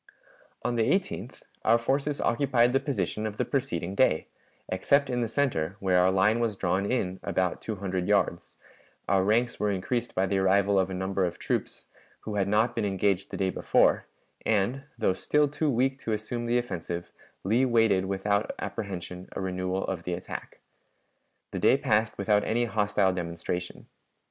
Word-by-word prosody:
On 120 Hz, -, 0 dB
the 115 Hz, -, +1 dB
18th 185 Hz, -, -2 dB, 0.2 s
our 115 Hz, -, +5 dB
forces 140 Hz, +5 st, -1 dB
occupied 125 Hz, -1 st, +2 dB
the 135 Hz, -, +4 dB
position 110 Hz, -, -2 dB
of 105 Hz, 0 st, -7 dB
the -, -, 0 dB
preceding 95 Hz, -, -2 dB
day, 100 Hz, -8 st, +3 dB, 0.4 s
except 140 Hz, +10 st, +2 dB
in 125 Hz, 0 st, 0 dB
the 115 Hz, -, 0 dB
center, 110 Hz, -, 0 dB
where 95 Hz, -2 st, +3 dB
our 90 Hz, +1 st, +5 dB
line 100 Hz, +4 st, +3 dB
was 115 Hz, -4 st, -1 dB
drawn 95 Hz, +3 st, 0 dB
in 95 Hz, -7 st, -1 dB
about 90 Hz, -1 st, -1 dB
two 110 Hz, -, -4 dB
hundred 95 Hz, -2 st, -3 dB
yards, 100 Hz, -4 st, 0 dB, 0.5 s
our 95 Hz, -1 st, +3 dB
ranks 115 Hz, +4 st, +1 dB
were 105 Hz, -, +1 dB
increased 115 Hz, +5 st, -2 dB
by 95 Hz, -, +2 dB
the 95 Hz, 0 st, 0 dB
arrival 100 Hz, +1 st, +3 dB
of 95 Hz, 0 st, +1 dB
a 95 Hz, -, -4 dB
number 95 Hz, +1 st, -1 dB
of 90 Hz, -, -1 dB
troops, -, -, -3 dB, 0.4 s
who 110 Hz, -, -5 dB
had 100 Hz, -2 st, +1 dB
not 110 Hz, +4 st, +2 dB
been 115 Hz, -, -1 dB
engaged 100 Hz, -1 st, 0 dB
the -, -, -5 dB
day 95 Hz, -1 st, 0 dB
before, -, -, +2 dB, 0.4 s
and, 110 Hz, +5 st, +1 dB, 0.2 s
though 110 Hz, -5 st, +2 dB
still 150 Hz, +9 st, +2 dB
too 150 Hz, +2 st, -1 dB
weak 130 Hz, +2 st, +1 dB
to 115 Hz, -, -2 dB
assume 120 Hz, +3 st, -3 dB
the 120 Hz, +1 st, +2 dB
offensive, 90 Hz, -7 st, -4 dB, 0.3 s
Lee 115 Hz, +7 st, +2 dB
waited 115 Hz, -6 st, +3 dB
without 100 Hz, +2 st, 0 dB
apprehension 95 Hz, -2 st, -6 dB
a -, -, -4 dB
renewal 95 Hz, 0 st, -2 dB
of 95 Hz, -3 st, -3 dB
the 90 Hz, 0 st, -3 dB
attack. 90 Hz, -, -8 dB, 0.9 s
The -, -, -3 dB
day -, -, +5 dB
passed 110 Hz, 0 st, +1 dB
without 105 Hz, +1 st, +2 dB
any 120 Hz, +3 st, +1 dB
hostile 105 Hz, -4 st, +1 dB
demonstration. 90 Hz, 0 st, -4 dB
100 Hz, 175 wpm, -28 LUFS, 95-120 Hz, 0.9 s, our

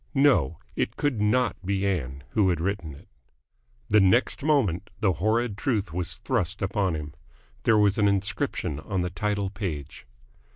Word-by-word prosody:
No, 135 Hz, -, +4 dB, 0.2 s
it -, -, -1 dB
could 135 Hz, -7 st, 0 dB
not 115 Hz, -1 st, +1 dB
be 100 Hz, +1 st, 0 dB
Ann 70 Hz, -9 st, -2 dB
who 105 Hz, -4 st, +3 dB
had 85 Hz, -3 st, 0 dB
written 85 Hz, -4 st, -3 dB
it. -, -, -16 dB, 0.8 s
The 105 Hz, -2 st, +5 dB
next 100 Hz, +6 st, +3 dB
moment 135 Hz, -, +1 dB
the 100 Hz, -4 st, +2 dB
horrid 110 Hz, +4 st, 0 dB
truth 110 Hz, -, -1 dB
was 90 Hz, -1 st, -3 dB
thrust 100 Hz, -6 st, -2 dB
upon 95 Hz, -3 st, 0 dB
him. 75 Hz, -1 st, -6 dB, 0.5 s
There 110 Hz, -, +5 dB
was 105 Hz, 0 st, +3 dB
an 105 Hz, -, +4 dB
inscription 100 Hz, -7 st, -1 dB
on 95 Hz, +2 st, -2 dB
the 90 Hz, -, -3 dB
title 100 Hz, +2 st, -1 dB
page. 85 Hz, -, -5 dB
100 Hz, 160 wpm, -26 LUFS, 90-110 Hz, 0.8 s, The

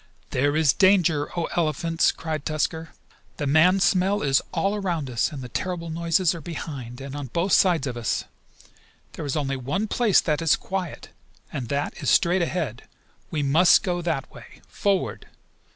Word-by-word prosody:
"There 145 Hz, +3 st, +1 dB
is 155 Hz, -5 st, +4 dB
danger, 175 Hz, -5 st, +3 dB
O 170 Hz, -, 0 dB
Elephants!" 165 Hz, 0 st, +1 dB
cried 155 Hz, -3 st, -5 dB
Tusker. 160 Hz, +2 st, -2 dB, 0.5 s
"The 145 Hz, -, -2 dB
man 160 Hz, +7 st, +4 dB
smell 190 Hz, +3 st, +2 dB
is 135 Hz, -2 st, +3 dB
all 195 Hz, +5 st, 0 dB
around 175 Hz, -10 st, -2 dB
us, 115 Hz, +6 st, 0 dB
and 140 Hz, -4 st, -7 dB
the -, -, -6 dB
terrible 170 Hz, +5 st, -4 dB
noises 170 Hz, +2 st, +1 dB
are 170 Hz, -, -7 dB
behind, 135 Hz, -6 st, -7 dB
and 135 Hz, +1 st, -7 dB
on 145 Hz, -2 st, -5 dB
both 170 Hz, -, -1 dB
sides 175 Hz, -7 st, +4 dB
of 125 Hz, -3 st, -4 dB
us. 120 Hz, -1 st, -1 dB, 0.9 s
There -, -, -6 dB
is 140 Hz, -, -1 dB
only 135 Hz, -2 st, -1 dB
one 165 Hz, -, -2 dB
place 220 Hz, -2 st, +3 dB
that 155 Hz, -1 st, 0 dB
is 165 Hz, -2 st, +4 dB
quiet, 185 Hz, -4 st, -5 dB, 0.4 s
and 125 Hz, -5 st, -4 dB
that 140 Hz, +1 st, -3 dB
is -, -, 0 dB
straight 175 Hz, +2 st, +3 dB
ahead. 165 Hz, -9 st, -3 dB, 0.4 s
We 150 Hz, -2 st, -2 dB
must 160 Hz, +6 st, +5 dB
go 175 Hz, -3 st, -1 dB
that 165 Hz, -6 st, -3 dB
way! -, -, -14 dB
Forward!" 200 Hz, -2 st, -1 dB
160 Hz, 170 wpm, -24 LUFS, 140-180 Hz, 0.9 s, must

